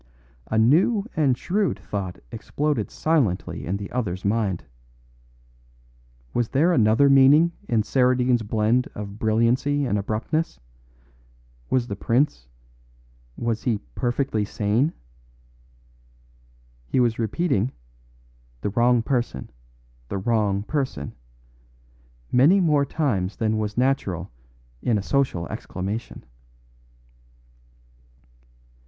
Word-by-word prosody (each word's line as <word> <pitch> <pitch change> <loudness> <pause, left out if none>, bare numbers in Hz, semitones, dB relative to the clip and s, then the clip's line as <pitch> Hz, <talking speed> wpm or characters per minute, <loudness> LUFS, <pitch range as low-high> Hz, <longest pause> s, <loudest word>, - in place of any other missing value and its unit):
A 110 - -1
new 175 - +3
and 140 -5 +2
shrewd 195 - 0
thought 95 -3 -5
exploded 150 0 -2
silently 140 - -1
in 95 +3 -1
the 100 0 -7
other's 100 -8 -3
mind. 100 -3 0 1.7
Was 120 -2 0
there 160 +6 +3
another 115 +2 +4
meaning 140 +5 +6 0.2
in 110 -2 +2
Saradine's 125 0 +2
blend 110 +3 +1
of 105 0 -7
brilliancy 120 +6 +1
and 105 -5 0
abruptness? 110 - -2 1.1
Was 130 -2 +1
the 100 - -5
prince 120 - 0 0.9
Was 115 -2 -2
he 120 -4 0 0.2
perfectly 120 - -1
sane? 110 +8 0 2.0
He 65 - 0
was 120 -2 +2
repeating, 115 - 0 0.9
"The - - -1
wrong 120 +1 +3
person 120 - -2 0.6
the 100 - -3
wrong 100 -1 0
person," 130 - -3 1.2
many 150 +11 +5
more 150 -6 +2
times 110 - -1
than 110 -1 0
was 105 0 -3
natural 110 -9 0 0.5
in 115 -3 +1
a 100 - -3
social 130 - 0
exclamation. 100 +5 -5
120 Hz, 100 wpm, -24 LUFS, 105-140 Hz, 2.0 s, meaning